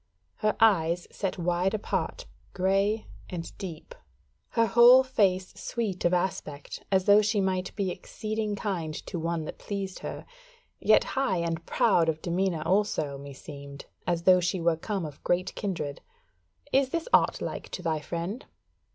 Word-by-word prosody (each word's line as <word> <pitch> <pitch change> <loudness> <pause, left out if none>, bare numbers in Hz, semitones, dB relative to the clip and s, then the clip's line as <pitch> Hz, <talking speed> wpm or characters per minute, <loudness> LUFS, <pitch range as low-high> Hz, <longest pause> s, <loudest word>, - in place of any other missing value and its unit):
Her 215 0 +1
eyes 175 -6 +3
set 195 -2 -3
wide 180 +3 +1
apart, - - -2 0.3
grey 195 +3 +1 0.2
and 170 -3 -6
deep: 175 - -7 0.6
her 230 -1 +3
whole 240 +4 +8
face 195 -8 +1
sweet 210 -6 -3
of 175 - +4
aspect, 175 -5 -2
as 190 -1 +3
though 205 +1 +7
she 215 0 +1
might 190 -1 0
be 195 -3 -1
exceeding 215 +2 -3
kind 175 -7 -3
to 175 - -4
one 165 -1 -2
that - - -7
pleased 195 -2 -4
her; - - -6 0.5
yet - - +5
high 265 -9 0
and 170 0 -2
proud 165 -1 +3
of 160 -1 -1
demeanour 175 -1 -1
also, 170 -8 +1
meseemed, 140 0 -10 0.2
as 170 -1 0
though 185 0 +7
she 180 +1 0
were 170 -1 +2
come 190 +2 -3
of 150 -2 -10
great 180 +1 0
kindred. 165 -8 -4 0.7
Is 270 -1 +4
this 335 +3 -2
aught - - +4
like - - -5
to 180 - -6
thy 160 -2 0
friend?" 170 - -4
185 Hz, 155 wpm, -28 LUFS, 165-205 Hz, 0.7 s, whole